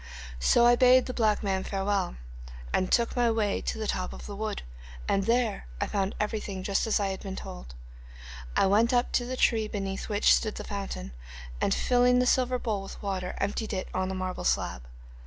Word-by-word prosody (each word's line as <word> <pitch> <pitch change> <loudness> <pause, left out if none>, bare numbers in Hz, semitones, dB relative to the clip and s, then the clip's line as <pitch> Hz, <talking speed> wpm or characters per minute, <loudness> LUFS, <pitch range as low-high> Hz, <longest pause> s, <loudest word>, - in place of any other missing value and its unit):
'So 235 - +4
I 240 0 +7
bade 255 +1 +6
the 255 - -4
black 220 -4 +1
man 190 -2 0
farewell, 195 - -1 0.6
and 185 - +1
took 235 -1 +2
my 240 -1 +3
way 220 -3 0
to - - -3
the 220 - -3
top 185 -3 -2
of - - -9
the 205 - -7
wood, 215 - -3 0.4
and 195 -1 +1
there 230 - +1
I - - 0
found 195 -1 -1
everything 210 -3 -3
just 200 +3 0
as 220 - +2
I 200 -1 0
had 190 - -4
been 195 -2 -6
told. - - -9 0.8
I - - +4
went 220 +5 +3
up 245 0 +2
to 245 - +1
the 255 +1 -4
tree 220 -3 +2
beneath 195 -1 -4
which 205 -1 +4
stood 215 -2 0
the - - -6
fountain, 195 - -5 0.5
and - - +2
filling 250 0 +3
the 250 - +3
silver 255 0 +2
bowl 220 -5 -2
with 195 - -9
water, 185 -2 -3
emptied 215 +1 -2
it 185 -1 -3
on 185 0 -1
the 190 - -3
marble 185 0 -4
slab. 60 0 -1
205 Hz, 205 wpm, -28 LUFS, 195-235 Hz, 0.8 s, I